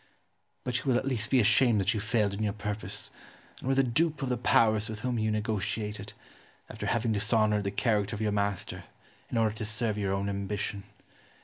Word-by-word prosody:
But 125 -1 -1
you 120 - -10
will 130 -3 +3
at 130 - -2
least 130 -6 0
be 130 - +4
ashamed 115 0 +4
that 100 +2 +2
you 110 - -1
failed 105 -1 +1
in 100 - -4
your 105 -2 0
purpose, 105 0 -5 0.5
and - - -7
were 135 - +3
the 135 - +4
dupe 145 +4 +1
of 130 - -1
the 125 - +1
Powers 110 -3 +3
with 110 -1 -6
whom 125 -1 -1
you 110 0 +1
negotiated, 105 -1 -2 0.6
after - - -5
having 115 -1 +1
dishonoured 105 0 +2
the - - +1
character 105 0 0
of 105 - -6
your 105 -1 +1
master 100 -2 -2 0.4
in 120 - -2
order 110 -2 +2
to 110 +1 -5
serve 110 0 0
your 100 -1 0
own 100 +1 -1
ambition. 100 0 -3
110 Hz, 205 wpm, -29 LUFS, 105-120 Hz, 0.6 s, be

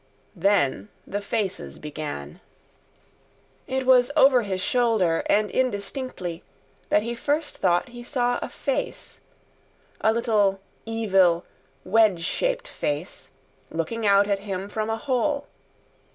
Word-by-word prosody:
Then 165 - +1 0.2
the 205 +1 -3
faces 195 - -3
began. 145 - -6 1.3
It 265 0 -1
was 255 0 +5
over 270 -4 +6
his 195 -4 -3
shoulder, 215 -6 +2
and 210 0 +2
indistinctly, 205 -6 -2 0.5
that 210 - +3
he 235 +1 -3
first 290 +5 -2
thought 175 +7 +2
he 240 0 -10
saw 245 -1 0
a - - -4
face; 275 - -4 0.8
a 220 - +4
little 210 -4 +2 0.3
evil 190 -6 +3 0.4
wedge 200 -3 +3
shaped - - -1
face, 150 +5 -4 0.4
looking 165 +8 -3
out 200 0 +5
at 200 -1 +1
him 195 -1 -5
from 215 +1 -2
a 225 - 0
hole. 285 +3 0
210 Hz, 120 wpm, -25 LUFS, 185-245 Hz, 1.3 s, over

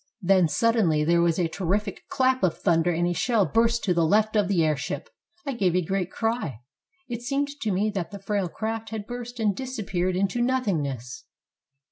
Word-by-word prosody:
Then 185 -1 +4
suddenly 190 -6 +2
there 170 +2 +3
was 170 -1 +2
a 175 -3 +1
terrific 195 +4 -2
clap 260 -1 +2
of 180 -4 +1
thunder 165 +1 +2
and 175 0 +1
a 175 - 0
shell 225 +1 +2
burst 230 +5 +2
to 185 - +2
the 170 -1 +2
left 215 +6 +2
of 205 -3 +3
the 185 -4 +2
airship. 155 - -2 0.3
I 275 - -2
gave 190 -7 +1
a 180 - +2
great 190 0 -1
cry. 225 - -2 0.5
It 240 -2 -5
seemed 280 +3 -1
to 220 - -1
me 205 +3 +1
that 190 -5 -3
the 200 - -8
frail 195 -2 -2
craft 225 +3 -4
had 220 -2 -5
burst 245 +1 -7
and 210 -3 +1
disappeared 195 -8 -2
into 200 +5 0
nothingness. 160 - -1
200 Hz, 190 wpm, -25 LUFS, 175-230 Hz, 0.5 s, Then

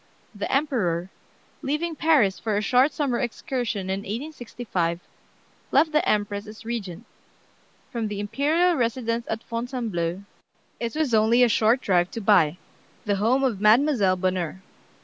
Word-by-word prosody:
"The 205 - -4
Emperor, 200 - 0 0.5
leaving 310 +4 -2
Paris 280 -13 +3
for 215 -2 -1
a - - +1
short 255 +5 +4
summer 275 -5 -1
excursion 240 -5 -3
in 190 +1 -1
1865, 220 - -4 0.7
left 315 - +4
the 305 0 +2
Empress 205 0 -1
as 215 +1 -11
Regent. 220 -3 -5 0.9
From 230 -4 -2
the 205 -1 -5
imperial 305 - +2
residence 235 -3 -1
at 225 +1 -3
Fontainebleau 230 -7 -3 0.6
it 230 -1 -3
was 305 -6 0
only 225 +3 +5
a 245 - +4
short 225 +4 +3
drive 180 -4 +2
to - - -6
By 180 -7 +3 0.5
(the 205 -2 +1
home 240 +7 +2
of 230 -7 0
Mademoiselle 215 -3 +4
Bonheur). 185 0 -2
225 Hz, 140 wpm, -24 LUFS, 200-260 Hz, 0.9 s, only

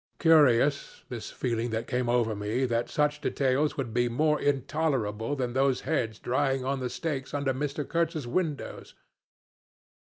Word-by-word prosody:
Curious, 145 -4 +4
this 115 -4 -6
feeling 120 -1 -2
that 110 +1 -2
came 125 -1 -1
over 120 -3 +2
me 105 +6 -1
that 120 -1 -1
such 150 0 0
details 140 +2 +1
would 125 -5 -3
be 120 0 +2
more 150 +5 +1
intolerable 135 -5 0
than 125 -3 -2
those 135 0 +2
heads 115 -7 -1
drying 135 +1 0
on 135 0 -1
the 125 -1 -2
stakes 140 0 -4
under 140 -2 0
Mr. 145 +2 -3
Kurtz's 165 -3 -1
windows. 150 +3 -3
130 Hz, 150 wpm, -28 LUFS, 120-145 Hz, -, Curious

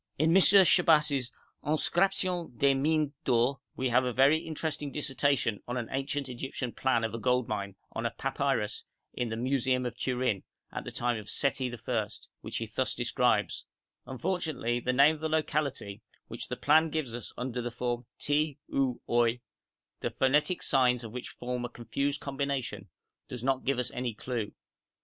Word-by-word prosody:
In 160 +4 +3
M. 190 - +8
Chabas' 160 -9 +5 0.3
'Inscriptions 175 +3 +1
des 140 +3 +4
Mines 150 +2 +1
d'Or' 125 +2 +2 0.2
we 130 0 0
have 125 +2 +4
a 125 - 0
very 135 +6 +5
interesting 155 -2 -4
dissertation 140 -6 0
on 120 +1 -2
an 120 -2 -3
ancient 135 +1 -2
Egyptian 125 0 -4
plan 125 -3 +1
of 110 -1 -2
a 115 - -3
gold 125 +1 +1
mine 100 -2 -3 0.2
on 115 +1 -2
a - - -2
papyrus 135 -2 -1 0.3
in 120 -1 -2
the 110 - -3
museum 130 0 +1
of 120 -1 -3
Turin, 125 -5 0 0.3
of - - -5
the - - -5
time 120 -2 -1
of 105 -1 -8
Seti 135 -1 +1
I., 115 -2 -2 0.3
which - - -5
he - - -2
thus - - -1
describes: - - +1 0.4
'Unfortunately, 150 -5 -1
the 125 - 0
name 140 +4 +6
of 155 - -9
the 160 - -1
locality, 140 -9 -1 0.3
which - - -6
the - - -4
plan 160 +2 +4
gives 150 -6 -2
us 120 - -6
under 125 0 -3
the 120 - -3
form 120 0 -3
Ti, 145 0 0 0.2
ou, 130 -3 +1
oi, 120 0 +2 0.6
the - - -1
phonetic 150 +7 +2
signs 125 -2 +3
of 115 - -7
which 125 +1 -6
form 125 0 -4
a 120 - -3
confused 140 +5 -2
combination, 135 -8 -3 0.4
does 125 -2 -7
not 130 0 0
give 140 0 +1
us 125 -1 -1
any 125 -3 -3
clue. 115 -3 -3
130 Hz, 175 wpm, -30 LUFS, 120-145 Hz, 0.6 s, M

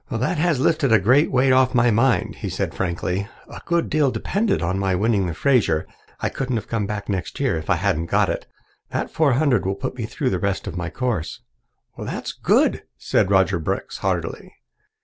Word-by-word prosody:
"That 130 +8 -1
has 165 -4 +2
lifted 140 -2 +2
a 110 - +7
great 130 - +4
weight 130 +1 +3
off 130 0 +3
my 120 -1 +4
mind," 115 +3 +1
he - - -4
said - - -3
frankly. 90 +2 -2 0.2
"A - - -10
good 170 -1 +1
deal 150 -3 +2
depended 195 - 0
on 95 +3 -1
my 95 -1 +1
winning 100 -1 +1
the 85 - -4
Fraser. 105 - +2 0.3
I - - 0
couldn't 130 -2 -3
have 110 - -3
come 110 -3 -2
back 105 0 -4
next 95 -3 -3
year 135 -7 +1
if 80 +4 -5
I 95 - +4
hadn't 85 -2 0
got - - +2
it. - - -3 0.4
That - - -3
four 155 -5 +2
hundred 130 -5 +2
will 95 +1 -1
put 100 - -4
me 115 -4 -4
through 130 +2 -2
the - - -1
rest 100 -1 -1
of - - -5
my 90 -1 -3
course." 120 -10 -3 0.5
"That's - - -5
good," - - +2 0.2
said 95 - +1
Roger 95 -2 +3
Brooks 80 - -3
heartily. - - -3
115 Hz, 205 wpm, -22 LUFS, 95-130 Hz, 0.5 s, a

